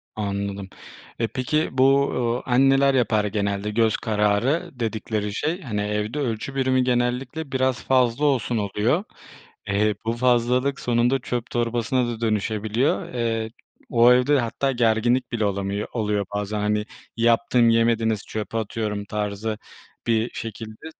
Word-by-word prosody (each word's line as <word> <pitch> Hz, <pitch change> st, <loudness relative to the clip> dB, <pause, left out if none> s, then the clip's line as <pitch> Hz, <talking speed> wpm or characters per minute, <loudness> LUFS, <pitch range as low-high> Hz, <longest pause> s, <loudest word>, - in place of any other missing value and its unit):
Anladım. 100 Hz, -1 st, -3 dB, 0.5 s
Eee, 115 Hz, -, +1 dB
peki 150 Hz, +6 st, -1 dB
bu, 135 Hz, +1 st, +4 dB, 0.3 s
eee, 125 Hz, -, -5 dB
anneler 135 Hz, +1 st, +4 dB
yapar 110 Hz, -4 st, +2 dB
genelde, 100 Hz, 0 st, -1 dB
göz 110 Hz, +1 st, +2 dB
kararı 110 Hz, -, 0 dB
dedikleri 110 Hz, -2 st, -2 dB
şey, 165 Hz, -, -2 dB
hani, 105 Hz, -, -3 dB
evde 105 Hz, +6 st, -2 dB
ölçü 130 Hz, 0 st, -3 dB
birimi 130 Hz, -1 st, +2 dB
genellikle 125 Hz, +4 st, -1 dB
biraz 130 Hz, -2 st, 0 dB
fazla 130 Hz, +1 st, +2 dB
olsun 125 Hz, -4 st, +1 dB
oluyor. 105 Hz, -, 0 dB, 0.6 s
Eee, 105 Hz, +1 st, +1 dB
bu 115 Hz, -, 0 dB
fazlalık 125 Hz, +3 st, +1 dB
sonunda 120 Hz, +1 st, +1 dB
çöp 120 Hz, -1 st, -4 dB
torbasına 120 Hz, +1 st, 0 dB
da 120 Hz, -1 st, -5 dB
dönüşebiliyor. 110 Hz, +4 st, 0 dB
Eee, 115 Hz, -2 st, -1 dB, 0.4 s
o 120 Hz, +1 st, +6 dB
evde 130 Hz, +3 st, +3 dB
hatta 130 Hz, +3 st, -1 dB
gerginlik 120 Hz, +1 st, +1 dB
bile 110 Hz, -3 st, 0 dB
olamıyor 100 Hz, +1 st, -2 dB
oluyor 105 Hz, -3 st, 0 dB
bazen, 105 Hz, +1 st, -2 dB
hani, 105 Hz, 0 st, 0 dB, 0.3 s
yaptım 115 Hz, +1 st, +3 dB
yemediniz 115 Hz, -2 st, +2 dB
çöpe 110 Hz, +1 st, -4 dB
atıyorum 105 Hz, -1 st, -3 dB
tarzı 105 Hz, +1 st, -3 dB, 0.5 s
bir 115 Hz, +1 st, +2 dB
şekilde. 110 Hz, +3 st, -7 dB
115 Hz, 130 wpm, -23 LUFS, 105-125 Hz, 0.6 s, o